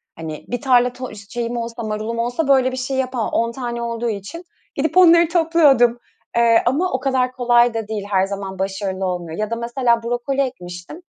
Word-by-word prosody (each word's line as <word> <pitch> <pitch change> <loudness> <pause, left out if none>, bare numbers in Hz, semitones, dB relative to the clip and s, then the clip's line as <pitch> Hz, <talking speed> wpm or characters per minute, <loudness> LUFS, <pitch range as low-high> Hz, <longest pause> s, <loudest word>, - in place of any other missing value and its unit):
Hani 160 -2 -7
bir 245 -1 -4
tarla 250 -2 +3
to 255 -3 -7
şeyim 235 +1 -3
olsa 230 0 -5
marulum 215 +2 -3
olsa 245 +6 -1
böyle 260 -2 +4
bir 260 - -5
şey 265 +1 -3
yapamam. 255 -3 -1
10 230 0 +1
tane 240 -1 -5
olduğu 235 0 -2
için 210 - -6 0.3
gidip 310 +5 -1
onları 340 -2 +7
topluyordum. 300 -9 +4 0.4
Eee, 230 -1 +4
ama 310 +9 +1
o 260 - 0
kadar 260 -2 0
kolay 240 -1 +3
da 225 -2 -4
değil. 210 -2 -4
Her 190 -1 +2
zaman 195 -1 -6
başarılı 190 0 -3
olmuyor 175 -3 -4
ya 215 0 -1
da - - 0
mesela 235 0 0
brokoli 245 +4 -1
ekmiştim. 180 - -6
240 Hz, 190 wpm, -20 LUFS, 215-260 Hz, 0.4 s, onları